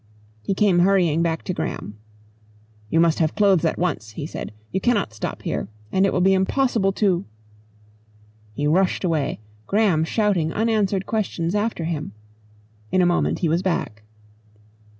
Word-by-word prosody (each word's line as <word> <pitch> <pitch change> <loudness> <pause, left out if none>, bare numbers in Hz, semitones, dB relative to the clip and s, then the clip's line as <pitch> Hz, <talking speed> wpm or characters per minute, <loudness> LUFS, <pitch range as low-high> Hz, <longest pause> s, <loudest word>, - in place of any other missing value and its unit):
He 190 - -2
came 190 -3 +3
hurrying 175 -4 +3
back 165 -1 -1
to 185 - -3
Graham. 105 -9 -5 0.9
"You 165 - +2
must 165 -1 +3
have 160 -2 +1
clothes 200 -5 +3
at 160 - 0
once," 135 -11 -2
he 145 - -5
said. 155 - -6 0.2
"You 190 - -1
cannot 205 - +1
stop 110 - -5
here - - -2 0.2
and 190 +1 +3
it - - 0
will 180 - 0
be 190 +1 +4
impossible 195 +1 +1
to 190 -4 +1 0.6
" 105 0 -31
He 145 - -2
rushed 180 +7 +2
away, 160 - -1 0.3
Graham 200 -6 +2
shouting 180 -3 +1
unanswered 210 -4 +1
questions 185 -6 -2
after 210 -4 -1
him. 155 -9 -4 0.8
In 185 - +3
a - - +4
moment 175 0 +1
he - - +3
was 165 +3 +1
back. 170 - -2
175 Hz, 160 wpm, -22 LUFS, 155-195 Hz, 0.9 s, be